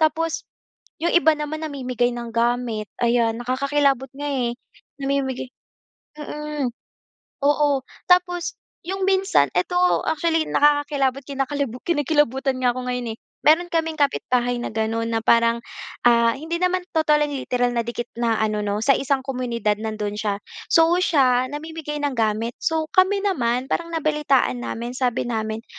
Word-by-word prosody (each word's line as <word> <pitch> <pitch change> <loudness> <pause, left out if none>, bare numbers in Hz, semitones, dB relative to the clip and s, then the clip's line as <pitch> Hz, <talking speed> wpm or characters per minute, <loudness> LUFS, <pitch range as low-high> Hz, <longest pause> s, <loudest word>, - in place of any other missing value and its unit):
Tapos 320 +1 +1 0.6
'yong 340 - +1
iba 320 -2 +5
naman 310 +1 -4
namimigay 250 -4 -1
ng 240 -1 -6
gamit 235 -2 0 0.2
ayan, 235 -1 +2
nakakakilabot 270 +1 +1
nga 290 +1 -4
eh, 250 -4 -1 0.5
namimigay 270 -2 -1 0.7
mm, 300 -2 -3 0.8
oo. 290 -2 +2 0.3
Tapos, 355 -1 +2 0.3
'yong 385 0 -2
minsan, 380 - +3
ito 180 - 0 0.3
actually 320 0 +1
nakakakilabot, 290 -2 +2
kinakalibu 275 -2 -2
kinikilabutan 290 -4 +1
nga 245 -1 +3
ako 255 0 -5
ngayon 245 -3 -3
eh. - - -58 0.2
Mayro'n 340 +3 +3
kaming 325 -1 0
kapitbahay 245 -4 +1
na - - -3
gano'n, 225 +1 -1
na 225 -1 -1
parang, 235 0 +3 0.4
ah, 235 -1 +4
hindi 330 +4 -4
naman 365 0 +1
totally 300 -2 +3 0.2
literal 245 -1 0
na 235 - 0
dikit 240 0 -4
na 230 -2 +2
ano 215 -1 0
'no, 205 +1 -1
sa 275 - +6
isang 275 -1 0
komunidad 240 -5 -1
nando'n 215 -2 -3
siya. 210 -1 -1 0.3
So, 330 0 +5
siya 255 -7 +3
namimigay 300 0 -5
ng 285 - 0
gamit. 225 +1 0
So, 320 -1 0
kami 380 +2 +4
naman 250 -10 +1
parang 335 +2 -1
nabalitaan 285 - +1
namin, 235 - -4
sabi 250 -2 0
namin, 220 -1 -3
265 Hz, 140 wpm, -22 LUFS, 235-300 Hz, 0.8 s, sa